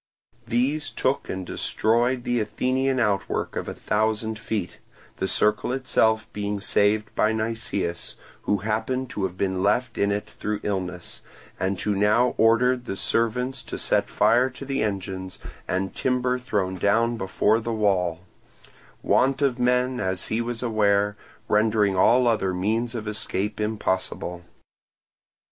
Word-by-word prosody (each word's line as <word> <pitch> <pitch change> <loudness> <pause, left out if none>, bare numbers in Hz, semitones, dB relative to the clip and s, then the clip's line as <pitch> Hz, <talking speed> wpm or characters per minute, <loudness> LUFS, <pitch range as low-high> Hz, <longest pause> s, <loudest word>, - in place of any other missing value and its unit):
These 130 +6 0
took 130 +2 -1
and 95 0 -4
destroyed 120 +7 +1
the 120 0 0
Athenian 130 +5 0
outwork 105 -4 0
of - - -3
a - - -4
thousand 110 +1 -1
feet, 95 -6 -4 0.4
the 95 - -1
Circle 105 +5 +1
itself 110 -4 +2
being 105 0 -2
saved 105 +1 +1
by 105 - +2
Nicias, 110 -6 -3 0.3
who 105 - +1
happened 115 +4 -1
to 100 - -1
have 90 -1 -5
been 95 -1 -1
left 115 +5 +1
in 100 0 +2
it 100 +1 -2
through 105 0 -4
illness, 95 -3 -4 0.4
and 95 0 -1
who 105 +3 0
now 105 +5 +3
ordered 120 +3 +4
the 95 - -4
servants 125 +5 0
to - - -6
set - - +1
fire 120 +5 +3
to 130 +2 -9
the 135 0 -1
engines 95 -2 -3 0.3
and 95 +1 -1
timber 125 0 0
thrown 100 -7 -2
down 115 +5 +2
before 105 +2 +1
the 115 +1 -4
wall; 95 -6 +1 0.8
want 135 +1 +3
of 130 -3 +1
men, 125 +1 +2
as 95 -4 -2
he 110 +2 0
was 120 0 -4
aware, 105 -3 +2 0.3
rendering 105 -2 +2
all 125 +6 +5
other 95 -5 +1
means 115 +6 -1
of 110 -2 -4
escape 105 -1 -2
impossible. 95 -4 -2
110 Hz, 145 wpm, -25 LUFS, 100-120 Hz, 0.8 s, all